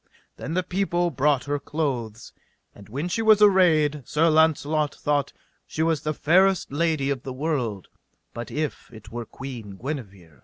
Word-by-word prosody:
Then 160 +4 -5
the 185 - +1
people 175 -1 0
brought 140 0 +2
her 145 0 -2
clothes. 125 -8 -4 0.4
And 100 0 -15
when 140 +9 -3
she 190 +6 -1
was 220 -1 +5
arrayed, 165 -8 +4
Sir 160 +2 +3
Launcelot 155 -1 +2
thought 145 -1 0 0.4
she 160 - -2
was 160 -2 +1
the 155 - -2
fairest 185 +3 +3
lady 150 -2 0
of 135 -3 -2
the 130 - -6
world, 130 - -2 0.5
but 120 0 -6
if 155 -1 -4
it 110 -1 -13
were 120 0 -5
Queen 115 -8 -8
Guenever. 100 - -7
145 Hz, 160 wpm, -24 LUFS, 125-165 Hz, 0.5 s, was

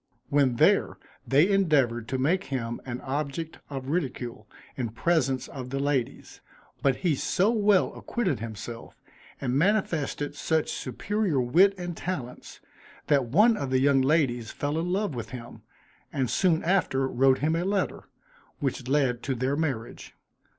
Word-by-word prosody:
When 140 -4 +3
there, - - +3 0.3
they 145 +6 +5
endeavored 145 - +2
to 130 - -2
make 175 +9 +1
him 120 -4 -4
an 125 0 -4
object 145 +4 -4
of 135 -2 -6
ridicule, 125 -9 -3 0.3
in 120 -4 -2
presence 130 0 0
of 130 -2 -7
the 135 - -3
ladies; 140 -3 -2 0.4
but 135 -2 +3
he 175 0 0
so 190 - +1
well 210 -4 +3
acquitted 210 - -2
himself, 115 +1 -8 0.4
and 125 -2 -2
manifested 160 -5 0
such 155 +2 0
superior 185 - -1
wit 175 +11 +4
and 175 -1 -5
talents, 135 -10 -6 0.5
that 140 -3 +4
one 210 - +4
of 140 -9 -3
the 130 - +2
young 135 0 +4
ladies 130 -5 +1
fell 145 +2 -2
in 175 +2 -2
love 200 -3 0
with 120 -3 -5
him, 120 -3 -9 0.5
and 135 -7 -1
soon 170 +3 +2
after 160 -7 +1
wrote 130 +1 +3
him 155 +3 0
a 170 - 0
letter, 195 +1 -1 0.5
which 135 -4 -3
led 130 -3 +1
to 135 - -2
their 130 +3 0
marriage. 135 -7 -4
140 Hz, 150 wpm, -27 LUFS, 125-170 Hz, 0.5 s, they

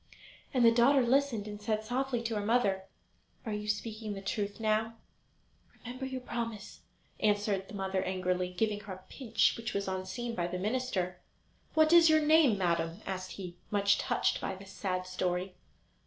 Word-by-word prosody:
And 250 -4 +3
the 230 - +8
daughter 250 +3 +5
listened, 245 -4 +2
and 210 0 -7
said 215 +1 -1
softly 245 +1 -1
to 230 0 -2
her 210 -1 -1
mother: 205 -4 +2 0.6
"Are 220 - -2
you 210 0 -4
speaking 215 0 -3
the 195 - -6
truth 200 +1 -2
now?" 220 +1 +1 0.8
"Remember 255 +3 -6
your 260 -1 -5
promise," 230 -4 -5 0.4
answered 205 -2 +1
the 205 - -9
mother 190 -1 -1
angrily, 185 -1 -1
giving 210 +3 0
her 200 -2 -7
a 185 0 -12
pinch 235 -5 +2
which 230 0 -5
was 200 0 -1
unseen 190 +6 -3
by 175 -6 -1
the 180 +1 -3
minister. 190 -4 -1 0.6
"What 315 +1 +5
is 335 -1 +8
your 315 0 +6
name, 305 -7 +5
madam?" 170 0 0
asked 185 -1 -4
he, 180 -3 -8
much 200 0 +3
touched - - +1
by 190 - -3
this 190 0 -12
sad 185 -2 -2
story. 185 0 -2
210 Hz, 170 wpm, -31 LUFS, 190-235 Hz, 0.8 s, the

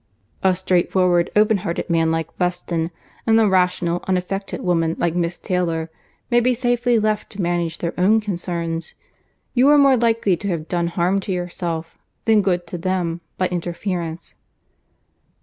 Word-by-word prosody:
"A 190 -1 +3
straightforward, 180 -1 +2
open 210 0 +4
hearted 175 -3 -3
man 165 -1 +2
like 165 0 -3
Weston, 175 -2 -1 0.4
and 225 0 +5
a 220 - +4
rational, 180 -2 +1
unaffected 190 +1 -2
woman 165 -2 +1
like 170 - 0
Miss 170 0 -1
Taylor, 165 -3 -2 0.4
may 240 - +5
be 250 +1 +2
safely 245 0 +1
left 215 -1 0
to 200 - -4
manage 170 -1 -1
their 170 - -3
own 210 +5 +4
concerns. 170 -5 -3 0.6
You 255 +3 +5
are 295 - +7
more 275 -2 +5
likely 225 -5 +2
to 200 - -5
have 165 -4 -2
done 170 -1 0
harm 175 +3 +1
to 195 - -5
yourself, 175 -2 -4 0.3
than 220 -2 +5
good 180 -2 0
to 175 +1 -6
them, 175 -1 -1 0.2
by 185 - +1
interference." 175 -1 -4
180 Hz, 155 wpm, -21 LUFS, 170-205 Hz, 0.6 s, are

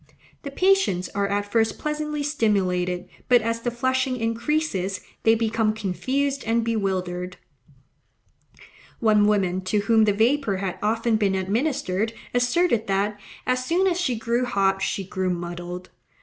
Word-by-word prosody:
The 280 - -6
patients 365 - +2
are 200 0 0
at 205 0 -2
first 225 0 +2
pleasantly 300 -1 -3
stimulated, 185 -10 0 0.2
but, 245 -2 +5
as 230 +1 -1
the 240 - -1
flushing 260 +1 0
increases, 230 - -1 0.2
they 225 0 +4
become 225 -1 0
confused 265 +8 -1
and 230 +1 +1
bewildered. 185 -5 -2 1.6
One 210 -2 +4
woman 190 -3 +1
to 205 +2 +1
whom 220 +1 +4
the 205 - +3
vapour 225 0 +2
had 190 -1 -4
often 225 +1 +1
been 200 -3 +1
administered 220 +1 -1 0.2
asserted 245 0 +2
that, 200 +1 0 0.3
as 255 0 0
soon 345 +8 +1
as 360 -1 +1
she 250 -9 0
grew 235 +2 0
hot, 195 -4 +1
she 195 0 -1
grew 185 0 -2
MUDDLED. 175 +1 -5
220 Hz, 140 wpm, -24 LUFS, 195-255 Hz, 1.6 s, but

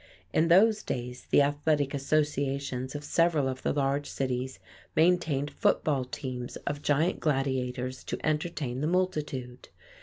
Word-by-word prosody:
In 160 - +3
those 210 +5 +5
days 125 0 -5
the 145 - +6
athletic 145 0 +1
associations 140 -2 -1
of 145 - -5
several 160 -3 +2
of 130 0 -4
the - - 0
large 140 0 0
cities 130 -1 -2 0.4
maintained 160 -4 +2
football 140 -4 +1
teams 125 -1 -5
of 145 0 -2
giant 150 +4 +1
gladiators 130 -3 -1
to - - -3
entertain 150 -5 -1
the 150 - +1
multitude. 150 -9 -2
140 Hz, 130 wpm, -29 LUFS, 130-155 Hz, 0.4 s, the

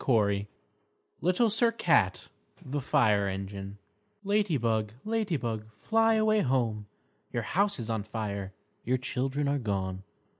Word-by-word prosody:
LITTLE 185 +6 +3
SIR 230 +2 +3
CAT 110 - +2 0.4
The 145 +2 -2
Fire 105 -6 +3
Engine 100 +1 -5 0.5
_Lady 200 -7 +2
Bug, 110 -2 0
Lady 215 -6 0
Bug, 110 -4 -4
fly 225 - +3
away 215 0 +3
home; 120 - 0 0.4
Your - - -2
house 200 +2 +1
is 115 -4 -5
on 110 -2 -1
fire, 100 -2 -4 0.3
your 130 +2 +1
children 130 +2 -2
are 140 0 +1
gone! 95 -5 -2
125 Hz, 125 wpm, -29 LUFS, -, 0.5 s, LITTLE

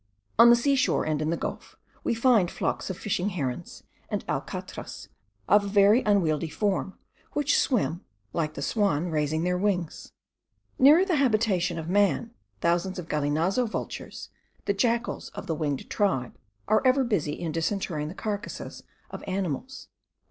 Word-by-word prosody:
On 235 +1 +9
the 240 - +8
seashore, 270 +2 +2
and 155 -1 -1
in 155 - 0
the 170 - 0
gulf, - - -6 0.3
we - - 0
find 230 -6 +4
flocks - - -2
of 185 - -4
fishing 195 -1 -1
herons, 140 -10 -4 0.3
and - - -3
alcatras - - -5 0.4
of 205 +1 +5
a - - -4
very 205 +4 +5
unwieldy 165 - +1
form, 195 +1 -1 0.4
which 295 0 +2
swim, 195 - +1 0.3
like 155 -2 -2
the 140 - -4
swan, 180 -6 0
raising 155 +1 0
their 180 0 0
wings. 185 -5 -2 0.7
Nearer 300 +8 +7
the 360 -5 +1
habitation 215 -9 +1
of 160 -1 -5
man, 205 +4 +2 0.3
thousands 175 +3 +1
of 175 -2 -7
galinazo 160 - +1
vultures, - - -6 0.4
the 200 - +1
jackals 235 +4 -1
of - - -6
the 170 - -1
winged 150 -3 -2
tribe, 185 - 0 0.3
are 215 - +4
ever 265 +1 +4
busy 195 - 0
in 165 0 -4
disinterring 165 -2 -2
the 165 - -7
carcases 205 -1 -5 0.3
of - - -7
animals. 195 - -3
190 Hz, 155 wpm, -27 LUFS, 160-225 Hz, 0.7 s, On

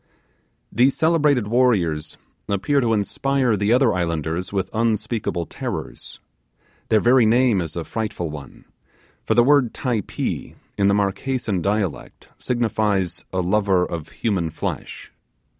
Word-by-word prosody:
These 130 +5 +3
celebrated 150 -7 +3
warriors 95 -11 +1 0.3
appear 140 +9 +1
to 115 -2 +1
inspire 125 +3 +1
the 100 +2 0
other 125 -2 +4
islanders 85 0 -2
with 95 -2 -2
unspeakable 110 -5 -1
terrors. - - -6 0.7
Their 110 - +4
very 120 0 +4
name 120 -3 +3
is 80 -2 -5
a 85 - -3
frightful 100 -6 -4
one; 75 -2 -10 0.6
for - - 0
the 120 - +6
word 135 -3 +3
'Typee' 120 -7 -3 0.2
in 100 - +2
the 100 - +3
Marquesan 105 0 -1
dialect 100 -5 -3
signifies 105 -7 -1
a 95 - 0
lover 95 -1 +2
of 80 -3 -6
human 95 -7 -1
flesh. 80 - -6
105 Hz, 125 wpm, -22 LUFS, 90-120 Hz, 0.7 s, the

